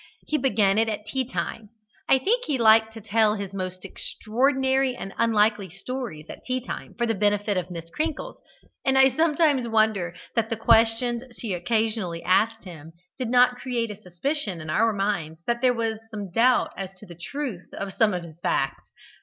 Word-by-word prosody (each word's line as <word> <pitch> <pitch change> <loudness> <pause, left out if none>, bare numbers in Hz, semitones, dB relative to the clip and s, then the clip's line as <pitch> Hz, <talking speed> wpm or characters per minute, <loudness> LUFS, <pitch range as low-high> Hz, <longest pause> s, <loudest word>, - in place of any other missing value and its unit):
He 305 - 0
began 210 -6 +3
it 225 0 +2
at 210 -1 -4
tea 260 +4 -1
time: 220 -4 -4 0.4
I 270 - +7
think 470 - +1
he 285 - 0
liked 220 -1 +5
to 225 - -8
tell 215 0 +2
his 200 -2 -6
most 185 -1 -5
extraordinary 265 +6 0
and 195 -5 -7
unlikely 215 -3 +2
stories 195 - -6
at - - -10
tea 255 0 -1
time 255 - -7
for 240 - 0
the 225 - +1
benefit 205 0 +1
of 180 -1 -2
Miss 165 -1 -8
Crinkles, 320 - -2 0.5
and 265 0 +2
I 265 0 +7
sometimes 300 -5 +2
wonder 215 -6 +1 0.2
that 225 -1 +1
the 225 - -2
questions 230 +2 +3
she 220 -5 -3
occasionally 200 -2 -1
asked 225 +5 +2
him 160 -3 -11 0.3
did 250 -3 -2
not 250 0 +4
create 240 -3 -2
a - - -7
suspicion 200 - -3
in 155 -1 -5
our 225 +5 +3
minds 195 -6 -2
that 235 0 -1
there 250 -1 +4
was 225 -1 -1
some 205 -4 -6
doubt 245 +6 +3
as 190 -1 -5
to 210 - -12
the 175 - -11
truth 190 - -6
of 195 -1 -4
some 210 -2 +3
of 175 - -4
his 165 -1 -12
facts. 135 -5 -1
220 Hz, 185 wpm, -25 LUFS, 195-250 Hz, 0.5 s, I